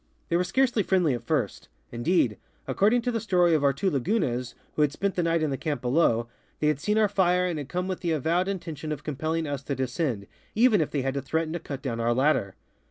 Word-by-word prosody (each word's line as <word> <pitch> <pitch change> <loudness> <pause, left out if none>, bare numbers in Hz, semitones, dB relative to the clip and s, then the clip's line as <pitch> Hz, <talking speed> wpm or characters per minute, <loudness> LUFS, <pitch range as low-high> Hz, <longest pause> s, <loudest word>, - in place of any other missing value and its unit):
They 170 - +1
were 175 - +3
scarcely 240 +5 +2
friendly 180 -7 +2
at 120 - -3
first; 120 - -2 0.2
indeed, 120 - +1 0.3
according 225 +4 +2
to 245 - 0
the 230 - -1
story 180 -6 +3
of 155 -2 +2
our 140 - +5
two 185 +8 -1
Lagunas, 135 - -1 0.2
who - - +1
had 150 -2 +3
spent 195 +5 -1
the 180 - 0
night 165 -1 +1
in 150 - 0
the 135 - -1
camp 150 -3 -2
below, 120 -3 +2 0.3
they 150 - +2
had 150 -2 0
seen 210 +7 0
our 215 -1 +4
fire 180 -2 +2
and 170 -4 -2
had 140 -2 -7
come 180 +1 -2
with 185 -1 -3
the 175 - -2
avowed 165 +5 +1
intention 165 -6 -4
of 150 - -4
compelling 155 +2 -2
us 145 -2 -3
to 140 0 -3
de 130 - 0
scend, 125 -6 -2 0.3
even 220 -4 +5
if 155 - 0
they 140 -3 -2
had 135 0 -1
to 140 - -2
threaten 160 +1 -2
to 175 - -2
cut 140 -3 -7
down 120 -4 -3
our 120 +1 +1
ladder. 130 -8 +1
155 Hz, 245 wpm, -26 LUFS, 135-180 Hz, 0.3 s, our